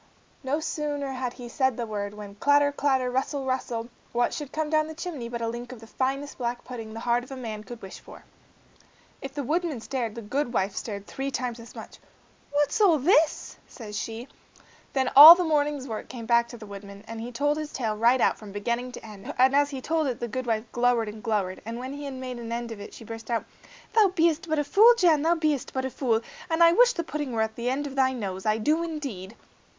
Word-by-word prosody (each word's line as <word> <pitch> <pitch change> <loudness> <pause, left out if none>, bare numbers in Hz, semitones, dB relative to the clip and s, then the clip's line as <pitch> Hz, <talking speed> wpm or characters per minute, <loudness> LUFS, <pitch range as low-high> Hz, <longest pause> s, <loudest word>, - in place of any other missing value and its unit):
No 280 +2 -1
sooner 295 -3 -3
had 255 -2 -3
he 245 -2 -9
said 260 0 0
the 240 - -2
word, 205 -1 -4
when 205 -1 -9
clatter, 285 +6 +3
clatter, 265 -3 +1
rustle, 270 +2 -1
rustle, 245 -3 -2 0.3
what 240 0 +1
should 295 -2 -5
come 315 0 -1
down 310 0 +2
the 315 - -8
chimney 315 -8 -5
but 235 -1 -4
a - - 0
link 240 +2 -5
of 250 - -9
the 225 - -12
finest 270 +5 -3
black 240 0 -3
pudding 230 -3 -7
the 225 - -6
heart 240 0 +1
of 270 +1 -8
man 220 -4 -6
could 240 0 -9
wish 190 - -9
for. - - -14 1.0
If 270 +1 -7
the 285 - -2
woodman 315 0 -1
stared, 235 -2 -3
the 235 - -7
goodwife 230 -4 -1
stared 200 -3 -5
three 270 +5 -4
times 250 -3 -3
as 230 +1 -12
much. - - -10 0.5
"What's 290 +7 +1
all 360 -6 +6
this?" 310 +2 +2
says 210 -4 -9
she. 225 +4 -5 0.7
Then 265 -2 +1
all 305 +5 +13
the 360 - 0
morning's 295 -4 0
work 220 -3 -6
came 235 -3 -7
back 235 0 +3
to 240 - -10
the 220 - -10
woodman, 200 0 -10
and 225 0 -6
he 240 +2 -6
told 290 +5 0
his 305 -1 -5
tale 225 -5 -2
right 235 +4 +4
out, - - +2
from 210 -2 -10
beginning 235 +5 -2
to - - -9
end, 210 -3 -8
and 260 +2 +5
as 285 0 +4
he 270 -2 -6
told 320 +1 0
it 250 -3 -3
the 240 - -3
goodwife 230 -2 -2
glowered 240 -2 +2
and 215 +1 -9
glowered, 205 -5 -1
and 230 +2 -5
when 260 +2 -5
he 290 0 -7
had 275 -1 -5
made 255 -1 -6
an 230 -1 -7
end 235 0 -3
of 220 - -7
it 205 - -9
she - - -11
burst 225 0 -8
out, 230 -1 -1 0.5
"Thou 440 -3 +6
bee'st 330 -1 +2
but 315 - +1
a 295 - +2
fool, 445 +10 +6
Jan, 335 -7 +4
thou 330 +3 +3
bee'st 305 -5 -1
but 260 0 -1
a 265 - -3
fool; 230 -3 +1 0.3
and 330 +1 +4
I 335 - +8
wish 485 +6 +5
the 340 - -2
pudding 295 -5 -4
were 220 -1 +2
at 220 0 -4
thy 265 +2 0
nose, 195 -5 -4
I 215 0 +3
do 305 +9 +1
indeed." 270 - -5
255 Hz, 230 wpm, -26 LUFS, 230-290 Hz, 1.0 s, all